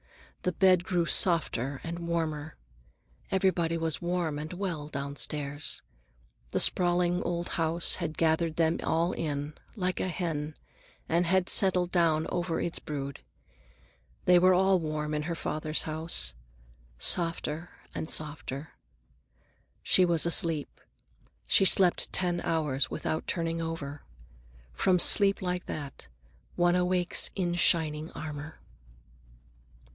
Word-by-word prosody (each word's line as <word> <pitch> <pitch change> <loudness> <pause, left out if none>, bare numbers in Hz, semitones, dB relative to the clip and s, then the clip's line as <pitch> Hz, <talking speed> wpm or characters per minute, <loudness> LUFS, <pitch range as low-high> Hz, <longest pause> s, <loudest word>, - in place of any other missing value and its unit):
The 180 - 0
bed 185 0 +3
grew 180 -2 0
softer 140 -8 +1
and 170 +1 -5
warmer. 160 -3 -3 0.7
Everybody 180 -3 +1
was 165 0 -1
warm 175 -4 -2
and 155 +1 -6
well 180 -5 -4
downstairs. 145 0 -3 0.7
The - - -1
sprawling 175 0 +3
old 175 0 -3
house 165 +1 +3
had 165 -3 -4
gathered 160 0 +1
them 165 0 +1
all 165 +2 0
in, 145 -3 -4 0.2
like 185 -3 -2
a - - -1
hen, 160 -4 -3 0.5
and 170 +1 +1
had 185 +1 +2
settled 180 -2 +3
down 165 -3 +2
over 175 -1 -2
its 170 - -3
brood. 140 -2 -6 1.1
They 180 -1 +6
were 185 +1 +5
all 190 0 +3
warm 155 -1 -3
in 150 - -1
her 170 +1 -3
father's 155 -1 -1
house. 155 - 0 0.6
Softer 165 - 0 0.2
and 155 - -5
softer. 145 -1 -3 1.1
She 185 - +4
was 170 -2 +2
asleep. 165 -3 +1 0.6
She 195 - +4
slept 185 -1 +4
ten 175 -1 +1
hours 150 -6 0
without 155 0 -3
turning 165 -1 -2
over. 155 -3 -5 0.7
From 180 - +2
sleep 200 +2 +5
like 180 0 -3
that, 140 - -6 0.5
one 175 0 +3
awakes 180 0 +1
in 175 -3 -1
shining 160 -3 +2
armor. 155 0 -7
165 Hz, 120 wpm, -28 LUFS, 155-180 Hz, 1.1 s, They